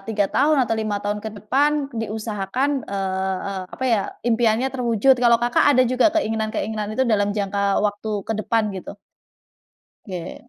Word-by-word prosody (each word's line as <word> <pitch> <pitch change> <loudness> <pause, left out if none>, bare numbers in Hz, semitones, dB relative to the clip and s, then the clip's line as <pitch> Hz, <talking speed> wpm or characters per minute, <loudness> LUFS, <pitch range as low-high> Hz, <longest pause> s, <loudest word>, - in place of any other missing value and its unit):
3 205 -2 +1
tahun 305 +1 +3
atau 225 - -1
5 215 -2 -1
tahun 205 0 -1
ke 220 - -5
depan 270 +8 +2 0.3
diusahakan, 220 +4 -2 0.2
eee 190 -1 -2
eee, 195 -2 -4
apa 260 - -4
ya 220 - +3 0.2
impiannya 235 +1 +2
terwujud. 245 0 +3
Kalau 235 -1 +6
Kakak 240 +1 +2
ada 255 - +6
juga 255 +3 +3
keinginan-keinginan 220 -4 -1
itu 260 - +2
dalam 210 -4 +2
jangka 200 0 -1 0.2
waktu 205 +1 -2 0.2
ke - - -2
depan 225 +1 +1
gitu? 190 +2 -8 1.1
Oke. 185 +4 -8
220 Hz, 155 wpm, -22 LUFS, 205-240 Hz, 1.1 s, Kalau